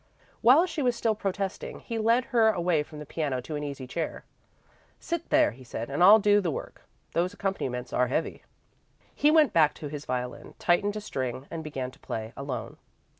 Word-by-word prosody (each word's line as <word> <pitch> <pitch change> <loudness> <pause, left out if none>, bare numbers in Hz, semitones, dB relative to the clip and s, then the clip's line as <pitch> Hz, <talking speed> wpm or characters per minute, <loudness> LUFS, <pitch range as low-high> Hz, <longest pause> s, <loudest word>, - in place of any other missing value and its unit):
While 275 +9 +7
she 325 -4 -4
was 245 -3 +2
still 230 -1 +1
protesting, 195 -2 -4
he 230 -1 -4
led 230 +3 +3
her 225 -2 +5
away 175 -6 +1
from 150 +1 -9
the 150 - -7
piano 140 -3 -2
to 150 +5 -6
an 150 - -3
easy 140 -2 -5
chair. 160 +6 -4 0.8
"Sit 340 -1 -4
there," - - +4
he 130 +4 -14
said, 120 +1 -6
"and 145 +6 +2
I'll 205 +4 +10
do 205 -1 +4
the 180 - -1
work. 150 - -6 0.3
Those 180 +4 0
accompaniments 130 -12 -3
are 125 0 +2
heavy." 155 +6 -2 0.7
He 295 - +3
went 305 -6 +5
back 155 -3 +4
to 150 - -7
his 150 0 -7
violin, 125 -1 -4
tightened 200 +4 +2
a 215 - -4
string, 130 - -4
and 165 -1 -5
began 135 -4 -4
to - - -20
play, 110 0 -5
alone. 135 -4 -5
165 Hz, 195 wpm, -28 LUFS, 130-210 Hz, 0.8 s, I'll